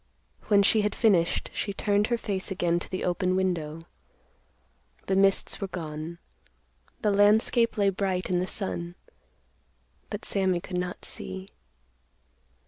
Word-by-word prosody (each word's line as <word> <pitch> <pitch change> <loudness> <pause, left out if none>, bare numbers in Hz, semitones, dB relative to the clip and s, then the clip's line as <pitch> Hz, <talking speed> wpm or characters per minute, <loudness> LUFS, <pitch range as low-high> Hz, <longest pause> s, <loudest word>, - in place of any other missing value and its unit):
When 200 -1 +5
she 215 +2 +4
had 210 0 -1
finished, 185 -8 +2
she 200 - -3
turned 205 +1 +1
her 240 - +1
face 200 -4 -3
again 175 -3 0
to - - -8
the 185 - -3
open 180 +1 0
window. 165 -4 -1 1.2
The 190 - 0
mists 195 +1 +2
were 195 - -1
gone. 160 -2 -6 0.9
The 210 - +3
landscape 215 +4 +4
lay 200 -1 +3
bright 185 -1 -1
in 180 -1 +1
the 185 - -1
sun. 175 -4 -3 1.1
But - - -5
Sammy 190 -3 +2
could 180 +1 -4
not 180 0 -5
see. 190 +1 -5
190 Hz, 135 wpm, -27 LUFS, 175-205 Hz, 1.2 s, When